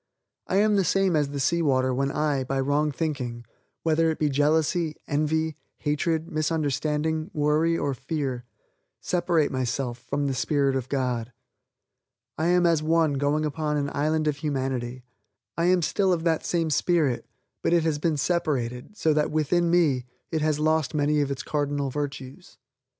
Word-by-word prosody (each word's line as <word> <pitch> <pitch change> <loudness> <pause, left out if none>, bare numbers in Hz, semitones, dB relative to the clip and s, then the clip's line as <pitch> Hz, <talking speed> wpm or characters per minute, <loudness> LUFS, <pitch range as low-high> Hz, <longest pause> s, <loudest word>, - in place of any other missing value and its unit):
I - - -1
am 210 +1 +4
the 195 - +3
same 190 -1 +2
as 145 -2 +1
the 140 0 -4
sea 170 +6 +1
water 130 -4 +2
when 135 +2 0
I, 145 -2 0
by 135 +1 -2
wrong 145 +3 +1
thinking: 130 -6 -3 0.4
whether 165 0 +2
it 160 - -1
be 150 - +1
jealousy, 155 +3 +1
envy, 155 +1 0 0.2
hatred, 160 +2 -1
misunderstanding, 155 0 -1
worry 155 +3 +2
or 140 -3 -1
fear 135 -1 -3 0.6
separate 175 -4 +1
myself 125 -1 -2
from 145 +3 -2
the 135 - 0
spirit 135 +2 +1
of 130 -1 -3
God. 125 -3 -1 1.0
I 160 - 0
am 175 0 +4
as 165 -3 +3
one 160 -1 +2
going 145 +2 +1
upon 150 0 -1
an 145 0 -1
island 155 +2 0
of 150 -2 0
humanity. 130 -4 -3 0.5
I 170 - 0
am 180 -1 +3
still 190 +4 +1
of 170 -2 0
that 165 -2 +1
same 165 -2 0
spirit; 155 -6 +1 0.3
but - - 0
it 170 -1 +4
has 155 -2 0
been 155 0 0
separated, 140 - -1
so 155 - +2
that 150 0 +1
within 165 +3 +1
me, 150 -8 +2 0.2
it 160 -2 0
has 155 -1 +1
lost 155 0 +1
many 150 0 +2
of 140 - -1
its 135 -2 -4
cardinal 145 -2 -1
virtues. 145 +3 -6
150 Hz, 165 wpm, -26 LUFS, 140-160 Hz, 1.0 s, am